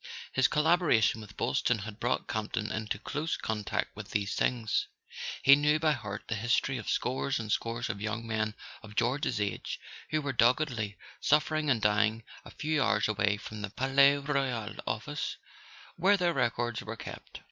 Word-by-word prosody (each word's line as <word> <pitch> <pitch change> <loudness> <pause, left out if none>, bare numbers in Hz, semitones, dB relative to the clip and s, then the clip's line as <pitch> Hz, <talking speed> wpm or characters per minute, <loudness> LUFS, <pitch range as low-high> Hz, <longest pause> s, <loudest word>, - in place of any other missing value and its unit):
His 130 - +4
collaboration 150 - +3
with 105 -1 -12
Boylston 125 - +1
had 110 +1 -8
brought 120 +2 0
Campton 110 0 -2
into 110 -2 -2
close 150 +8 -3
contact 105 -2 -2
with - - -8
these 100 -1 -1
things. 125 - 0 0.6
He 140 - +9
knew 150 +1 +3
by 155 0 +2
heart 105 -7 -4
the - - -1
history 120 +4 +1
of - - -6
scores 130 +2 0
and 110 -2 -4
scores 115 +2 -1
of 100 - -4
young 110 +2 -3
men 110 -1 -1 0.3
of 105 -1 -12
George's 125 +1 +1
age 105 -1 -3 0.3
who 155 -1 0
were 140 -1 -2
doggedly 120 -3 +2 0.2
suffering 155 0 +2
and 125 -4 +3
dying 105 +2 +2 0.2
a - - -11
few 155 -1 -1
hours 110 -4 +2
away 105 -1 +1
from 105 0 -8
the 105 - -3
Palais 140 +5 +4
Royal 135 -6 -1
office 145 +7 -3 0.6
where 195 +4 +4
their 175 -2 +2
records 120 -3 0
were 115 +1 -6
kept. - - -9
120 Hz, 170 wpm, -30 LUFS, 110-145 Hz, 0.6 s, He